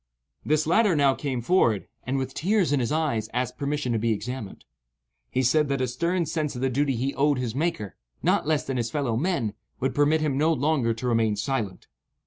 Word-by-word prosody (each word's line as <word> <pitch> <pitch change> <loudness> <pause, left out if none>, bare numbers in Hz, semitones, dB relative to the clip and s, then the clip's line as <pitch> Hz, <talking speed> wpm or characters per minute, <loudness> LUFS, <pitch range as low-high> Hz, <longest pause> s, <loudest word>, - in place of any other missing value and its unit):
This 155 +1 +1
latter 190 +3 +3
now 140 -2 +4
came 130 -4 -3
forward, 120 - +2 0.2
and, 135 +2 0
with 130 0 -3
tears 185 -1 +1
in 145 - +2
his 120 +1 -1
eyes, 145 -9 0
asked 125 0 -2
permission 145 -3 -1
to 115 - +1
be 115 +1 +1
examined. 110 0 -5 0.6
He 130 - 0
said 150 +4 +3
that 140 -1 0
a 130 - +1
stern 170 +8 0
sense 155 -2 -2
of 125 - -5
the 130 0 +1
duty 140 +1 +1
he 130 +4 -1
owed 145 0 +2
his 125 -3 -2
Maker, 135 - -2 0.3
not - - +2
less 155 -2 +2
than 135 -1 -2
his 120 -1 -1
fellow 130 -3 -1
men, 125 - 0 0.3
would 135 - 0
permit 150 +2 +3
him 145 -3 0
no 155 +2 +3
longer 135 -5 +1
to 125 +2 -4
remain 115 -3 +2
silent. 105 -3 -3
135 Hz, 210 wpm, -26 LUFS, 120-155 Hz, 0.6 s, now